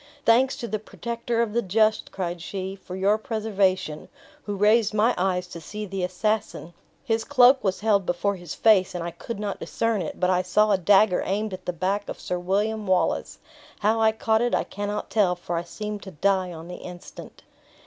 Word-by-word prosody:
"Thanks 255 +4 +4
to 240 -4 -5
the 215 0 -2
Protector 235 +2 -2
of 215 -3 -4
the 235 - +2
just," 215 +2 +1
cried 175 -2 -4
she, 190 +2 -5
"for 185 -2 -9
your 200 +3 +2
preservation! 200 - -1 0.4
Who 205 - -2
raised 215 +1 +3
my 225 +3 +3
eyes 180 0 0
to 170 -1 -8
see 210 +6 -6
the 195 -1 -4
assassin! 185 -1 -2 0.3
His 225 -1 0
cloak 260 -1 +5
was 190 -1 -1
held 205 -2 +3
before 200 +3 0
his 175 -4 -8
face, 195 -5 +4
and 175 - -3
I 170 - -4
could 230 +5 -7
not 205 -1 -3
discern 225 -3 -1
it; 160 - -6
but 180 0 +2
I 180 0 +3
saw 210 +3 +2
a 200 - +4
dagger 195 +1 +4
aimed 205 +1 -2
at 185 0 -8
the - - +1
bank 195 +4 -2
of - - -6
Sir 180 - -3
William 205 +4 -1
Wallace! 185 -1 +1 0.4
How 220 +2 +2
I 220 0 +5
caught 220 0 +1
it 240 0 +1
I - - +1
cannot 205 +1 -5
tell, 195 -5 +3
for 175 0 -5
I 165 - 0
seemed 210 +4 -6
to 190 - -9
die 185 +2 0
on 165 0 -9
the 180 - -7
instant." 175 -1 -11
200 Hz, 205 wpm, -25 LUFS, 185-220 Hz, 0.4 s, cloak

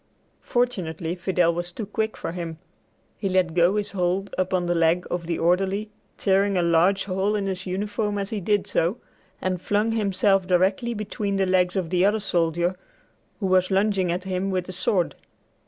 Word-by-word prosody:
Fortunately 175 -9 -1
Fidel 175 -1 +1
was 175 +1 -4
too 215 +4 -5
quick 220 +2 -2
for - - -4
him. 170 -2 -5 0.6
He 195 - -1
let 185 -3 +2
go 175 +3 +3
his 210 -1 -2
hold 190 +1 -1
upon 185 -1 0
the 175 - +1
leg 170 +1 +2
of 175 -1 -3
the 170 - -1
orderly, 195 +5 +1 0.3
tearing 195 0 +2
a 175 - +2
large 170 +4 +3
hole 195 +2 0
in 205 -1 -1
his 190 -1 -3
uniform 205 +2 -2
as 200 0 -3
he 215 -2 -2
did 205 +2 +1
so, 175 +8 0 0.5
and 185 -1 -1
flung 210 +4 +1
himself 195 -3 +2
directly 190 +6 +2
between 205 -1 -3
the 195 - +2
legs 185 0 +2
of 180 -4 -2
the 180 0 +3
other 210 +2 +3
soldier 175 -2 0 0.6
who 205 - -2
was 185 -1 +3
lunging 195 -2 +2
at 180 +2 -2
him 190 0 -2
with 185 -2 -1
the 185 - -7
sword. 185 -1 0
185 Hz, 185 wpm, -24 LUFS, 175-200 Hz, 0.6 s, go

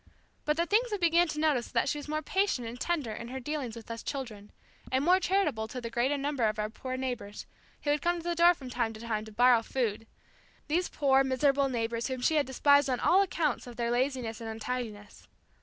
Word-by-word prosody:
But 300 +1 +1
the 340 - +2
thing 425 +5 +4
we 415 - 0
began 345 -1 +3
to 305 -1 -4
notice 295 -6 +1
was - - -16
that 235 - +2
she 295 - -1
was 290 - -9
more 305 +1 -2
patient 380 - 0
and 240 +2 -7
tender 305 -10 -1
in 235 +2 -6
her 260 +2 -5
dealings 265 -3 -4
with 230 0 -9
us 230 - -5
children, 225 -7 -6 0.4
and 260 +2 +1
more 365 +2 +5
charitable 345 - 0
toward 250 +1 -7
the 230 - -5
great 260 +5 +1
number 280 -4 0
of 215 0 0
our 210 0 -2
poor 255 +3 -5
neighbors, 245 -6 -5 0.4
who 290 - +1
would 295 0 +1
come 345 0 +1
to 335 - -7
the 345 0 -1
door 340 +1 +5
from 260 -5 -9
time 235 -2 -1
to 220 - -11
time 220 -2 -3
to 220 - -11
"borrow" 245 +1 +5
food 225 -2 -2 0.6
these 345 +4 0
poor, 270 -2 +3
miserable 275 +1 +2
neighbors 230 -1 -2
whom 260 -1 -3
she 315 - +2
had 290 - +2
despised 285 +1 +4
on 250 -2 0
account 345 -9 +2
of 240 - -9
their 235 0 -1
laziness 245 -3 -1
and 225 - -5
untidiness. 220 -2 -6
260 Hz, 230 wpm, -30 LUFS, 230-300 Hz, 0.6 s, more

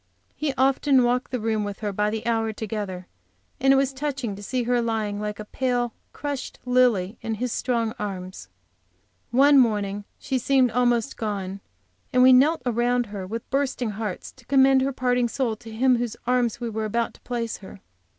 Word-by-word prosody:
He 300 -2 -1
often 270 0 +4
walked 245 +1 +1
the 250 - -2
room 220 -1 0
with 205 0 -6
her 205 -2 -2
by 210 +2 +1
the 220 0 -4
hour 225 -1 +1
together, 205 -4 -5 0.5
and 270 +1 +4
it - - +6
was 270 0 +2
touching 270 -6 -3
to 200 - -10
see 250 +4 -2
her 245 0 +1
lying 220 -3 -1
like 210 0 -4
a 215 - -6
pale; 245 0 -1 0.2
crushed 285 -3 -5
lily 240 -5 +2
in 225 -1 -2
his 245 +3 -3
strong 230 -3 -1
arms. 185 - -6 0.8
One 275 +3 +6
morning 205 -4 +1
she 265 - -2
seemed 255 -1 +3
almost 240 +1 +1
gone, 200 -3 -3 0.5
and 250 0 +4
we 260 0 +8
knelt 285 +3 +4
around 245 +1 +1
her 190 -2 -5
with 225 +3 -5
bursting 265 -4 0
hearts, 210 -3 -5
to 255 - -21
commend 270 -1 +5
her 270 +1 +1
parting 250 -1 +1
soul 240 -3 -1
to 225 - -12
Him 255 +4 +3
in 240 - +2
whose 240 -3 -3
arms 245 -2 +1
we 240 - -3
were 220 -1 -3
about 230 +2 -1
to - - -20
place 235 -2 -3
her. 195 0 -12
235 Hz, 190 wpm, -24 LUFS, 215-255 Hz, 0.8 s, we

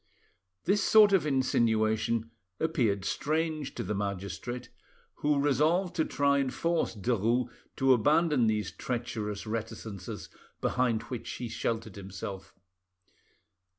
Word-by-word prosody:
This 200 +1 +2
sort 210 -2 +7
of 180 -5 +3
insinuation 115 -4 +1 0.3
appeared 115 -12 +1
strange 155 -1 -1
to - - -3
the - - -2
magistrate, 100 +5 -4 0.5
who 145 0 +2
resolved 155 +7 +2
to 160 - +3
try 140 0 +2
and 135 -2 0
force 165 -3 0
Derues 115 +3 +1 0.3
to 135 0 +5
abandon 145 +1 +3
these 105 -1 0
treacherous 110 -4 -4
reticences 110 -3 -5 0.3
behind 120 -3 +1
which 125 -2 -6
he 120 - -5
sheltered 110 -2 -3
himself. 95 0 -7
120 Hz, 115 wpm, -30 LUFS, 110-150 Hz, 0.5 s, sort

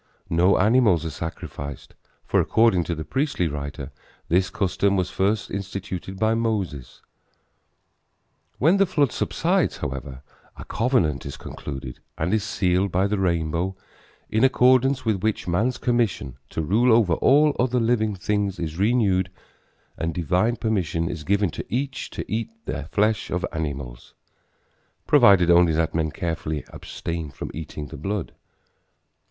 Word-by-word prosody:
No 90 +4 +4
animals 105 -5 +3
are 80 - -3
sacrificed, 70 -3 -7 0.3
for - - +2
according 110 -6 +3
to 85 - -2
the 80 0 -6
priestly 130 - 0
writer 70 -1 -6 0.4
this 90 +3 +2
custom 100 +2 0
was 90 -1 -1
first 100 +2 0
instituted 95 -1 -5
by 110 +2 +2
Moses. 105 - -3 1.5
When 165 +8 +4
the 195 -1 +4
flood 145 -7 +2
subsides, - - 0
however, 65 0 -6 0.3
a - - -9
covenant 110 - +1
is 70 - -7
concluded 65 -3 -7 0.2
and 85 +5 -1
is 110 -2 +2
sealed 95 -1 +1
by 95 +2 +2
the 100 0 0
rainbow 85 0 0 0.5
in 110 +3 +1
accordance 130 0 +4
with 105 -4 0
which 110 -2 -1
man's 110 +9 +1
commission 120 - 0
to 80 - -3
rule 115 +10 +3
over 110 -7 +4
all 145 - +4
other 125 0 +2
living 115 -3 +1
things 100 0 -1
is 80 0 -4
renewed 100 -4 +2 0.7
and 80 0 -2
divine 90 +7 +1
permission 85 -7 -1
is 80 -3 -6
given 100 0 +1
to - - -6
each 135 +2 -3
to - - -6
eat 115 +2 -2
of 225 0 -8
the - - -4
flesh 105 +6 0
of 90 - -1
animals, 70 -6 -5 0.9
provided 100 - +6
only 85 -1 +5
that 80 0 0
men 80 -1 0
carefully 80 -2 -3
abstain 85 -3 -5
from 65 - -7
eating 75 -2 -7
the - - -8
blood. 95 +4 -3
95 Hz, 145 wpm, -24 LUFS, 80-110 Hz, 1.5 s, provided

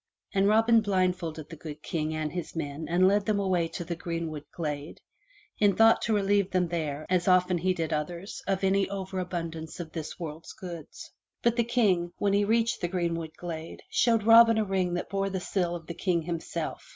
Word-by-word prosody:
And 195 0 +3
Robin 225 +2 +5
blindfolded 180 -6 -1
the 165 - -8
good 150 -1 -9
King 155 -1 -2
and 155 -1 -2
his 175 +1 -5
men 155 -1 -4
and 180 +2 +4
led 205 +2 +2
them 210 -2 +2
away 185 -4 +1
to 170 - -6
the 170 - -3
greenwood 165 -3 -4
glade, 150 -2 -5 0.6
in 205 -2 +4
thought 225 0 +6
to 225 - 0
relieve 200 -1 +2
them 180 -3 +1
there, 155 -3 -3
as 180 -1 +1
often 180 -1 +4
he 185 +3 +1
did 165 -3 -2
others, 170 +6 -4
of 195 0 0
any 195 0 +2
over 190 -1 -4
abundance 165 -3 -5
of 165 -2 -6
this 160 0 -6
world's 160 -1 -7
goods. 170 -5 -9 0.3
But 235 0 +3
the 235 - +3
King, 195 -8 +1
when 200 -1 +1
he 200 +1 +3
reached 230 +2 +1
the 175 - 0
greenwood 170 -3 -2
glade, 165 -2 -7
showed 230 -3 +3
Robin 230 0 +7
a 220 - +2
ring 185 -2 0
that 175 - -3
bore 195 0 0
the 190 -1 -2
seal 175 -1 -1
of 165 -2 -8
the 170 - -6
King 170 -1 0
himself. 170 0 -4
180 Hz, 200 wpm, -28 LUFS, 165-200 Hz, 0.6 s, Robin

